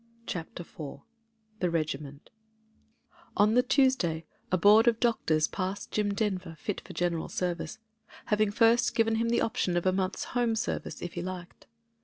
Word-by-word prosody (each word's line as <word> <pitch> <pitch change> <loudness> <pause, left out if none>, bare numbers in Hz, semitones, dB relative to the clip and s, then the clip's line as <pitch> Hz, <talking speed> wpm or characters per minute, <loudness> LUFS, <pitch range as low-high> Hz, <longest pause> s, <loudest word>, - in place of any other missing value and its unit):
CHAPTER 175 -2 -5
IV 145 -4 -9 0.6
THE 180 - +1
regiment'' 150 -3 -3 1.1
ON 210 +1 +5
the 250 - +6
Tuesday 250 - +2 0.3
a 185 - +3
board 210 +5 +6
of 230 -1 +4
doctors 160 -10 +2
passed 195 +1 -4
Jim 205 -1 0
Denver 185 -6 -2
fit 205 +6 -4
for - - -11
General 175 -2 -1
Service, 175 -3 -3 0.5
having 210 0 +2
first 230 +3 +3
given 225 -1 +2
him 230 +1 +1
the 235 - +2
option 180 -5 0
of 175 - -1
a 185 - +3
month's 185 -1 -1
home 240 -2 +2
service 220 - -3
if 175 - -5
he 175 - -4
liked. 180 -1 -7
190 Hz, 160 wpm, -29 LUFS, 170-225 Hz, 1.1 s, the